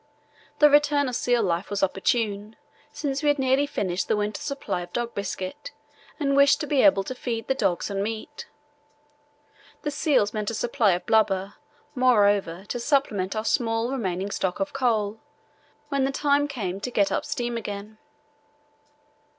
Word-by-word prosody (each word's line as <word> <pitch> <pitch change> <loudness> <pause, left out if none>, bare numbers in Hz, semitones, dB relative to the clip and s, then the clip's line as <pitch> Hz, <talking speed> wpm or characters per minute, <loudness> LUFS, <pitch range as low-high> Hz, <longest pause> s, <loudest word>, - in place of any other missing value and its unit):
The 300 - +7
return 290 -1 +4
of 250 - -4
seal 245 -1 +1
life 175 0 -1
was 205 -1 -2
opportune, 205 +2 0 0.4
since 285 -1 -3
we 300 - 0
had 290 - +3
nearly 265 +1 +2
finished 185 -8 -2
the - - +2
winter 210 0 -2
supply 280 -10 -3
of 175 0 -9
dog 240 -1 -2
biscuit 200 - -5 0.5
and 275 -2 +1
wished 280 0 +5
to - - -1
be 285 -2 +2
able 195 -1 +5
to 255 - -5
feed 230 -3 -4
the - - +2
dogs 195 -6 -1
on 195 0 -1
meat. 225 +7 -5 1.4
The 295 - -1
seals 280 -8 +1
meant 210 -2 -2
a 230 - -4
supply 225 -3 +2
of 175 - -3
blubber, 200 -3 +2 0.4
moreover, 205 - +2
to 245 - -4
supplement 235 -8 0
our 215 0 -2
small 230 +1 0
remaining 195 -6 -2
stock 185 -1 -2
of 195 - -2
coal 225 -5 0 0.7
when 275 -1 0
the 270 - +1
time 285 +1 +2
came 200 -9 -4
to 225 - -4
get 205 -5 +1
up - - 0
steam 240 -1 -3
again. 210 -1 -6
225 Hz, 165 wpm, -25 LUFS, 200-270 Hz, 1.4 s, The